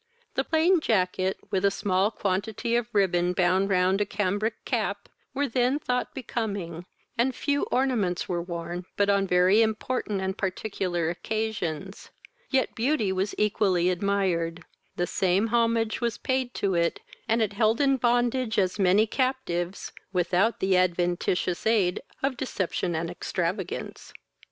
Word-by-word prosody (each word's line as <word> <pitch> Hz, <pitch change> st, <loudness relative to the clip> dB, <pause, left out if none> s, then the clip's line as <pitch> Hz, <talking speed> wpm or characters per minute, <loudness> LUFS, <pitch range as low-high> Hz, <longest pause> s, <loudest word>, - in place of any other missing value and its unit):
The -, -, 0 dB
plain 335 Hz, +3 st, +3 dB
jacket, 190 Hz, -6 st, +1 dB
with 190 Hz, -, 0 dB
a 200 Hz, -, +5 dB
small 195 Hz, 0 st, +1 dB
quantity 210 Hz, +3 st, -1 dB
of 240 Hz, -1 st, +1 dB
ribbon 180 Hz, -4 st, +2 dB
bound 185 Hz, +2 st, +2 dB
round 190 Hz, +1 st, +2 dB
a -, -, +2 dB
cambric 205 Hz, +2 st, -1 dB
cap, -, -, -2 dB, 0.3 s
were 285 Hz, +1 st, +1 dB
then 250 Hz, +2 st, +1 dB
thought 250 Hz, -4 st, -2 dB
becoming, 200 Hz, -9 st, -4 dB, 0.3 s
and 250 Hz, +1 st, +2 dB
few 285 Hz, -1 st, 0 dB
ornaments 235 Hz, -9 st, 0 dB
were 175 Hz, -1 st, -1 dB
worn 170 Hz, 0 st, -5 dB
but 205 Hz, 0 st, +3 dB
on 200 Hz, -1 st, +2 dB
very 180 Hz, +4 st, +4 dB
important 220 Hz, -1 st, -1 dB
and 190 Hz, 0 st, -2 dB
particular 185 Hz, -4 st, -2 dB
occasions; 195 Hz, -3 st, -4 dB, 0.4 s
yet 265 Hz, -2 st, +1 dB
beauty 230 Hz, -4 st, +1 dB
was 190 Hz, +2 st, -1 dB
equally 190 Hz, -4 st, +2 dB
admired: 180 Hz, -3 st, -1 dB, 0.3 s
the 175 Hz, -, 0 dB
same 190 Hz, +3 st, +1 dB
homage 230 Hz, -1 st, +1 dB
was 235 Hz, -2 st, -1 dB
paid 260 Hz, -1 st, -1 dB
to 195 Hz, -1 st, 0 dB
it, 170 Hz, -1 st, +1 dB, 0.3 s
and 225 Hz, +1 st, +2 dB
it 205 Hz, -2 st, -2 dB
held 220 Hz, +2 st, +2 dB
in 275 Hz, -2 st, +3 dB
bondage 240 Hz, -1 st, +1 dB
as 190 Hz, +1 st, +1 dB
many 195 Hz, +3 st, +4 dB
captives, 220 Hz, -8 st, -2 dB, 0.2 s
without 180 Hz, +4 st, +1 dB
the 190 Hz, 0 st, +2 dB
adventitious 180 Hz, +1 st, +1 dB
aid 200 Hz, -6 st, +2 dB, 0.2 s
of 270 Hz, -2 st, 0 dB
deception 185 Hz, -7 st, -2 dB
and 165 Hz, +1 st, -2 dB
extravagance. 180 Hz, +1 st, -4 dB
200 Hz, 140 wpm, -26 LUFS, 180-230 Hz, 0.4 s, a